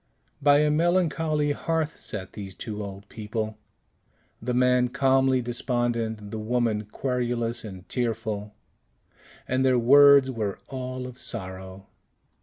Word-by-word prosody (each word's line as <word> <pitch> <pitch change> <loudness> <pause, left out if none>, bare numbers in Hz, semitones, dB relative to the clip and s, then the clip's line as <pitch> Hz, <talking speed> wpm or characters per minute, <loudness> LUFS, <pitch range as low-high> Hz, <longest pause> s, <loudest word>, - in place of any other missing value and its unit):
By 145 +1 +5
a 150 0 +3
melancholy 160 -2 +1
hearth 160 +1 -2
sat 95 -3 -6
these 95 -3 -8
two 105 -2 -5
old 100 0 -8
people, 110 0 -5 0.8
the 125 +2 -2
man 125 0 +3
calmly 130 0 +2
despondent, 120 -3 -1
the 110 - -4
woman 110 -1 0
querulous 120 -1 -2
and 95 -4 -9
tearful, 110 -4 -3 0.9
and 130 +1 +1
their 130 -1 +4
words 140 +2 +7
were 105 -5 -3
all 130 -1 -5
of 125 0 -8
sorrow. 95 -4 -4
120 Hz, 120 wpm, -26 LUFS, 105-130 Hz, 0.9 s, words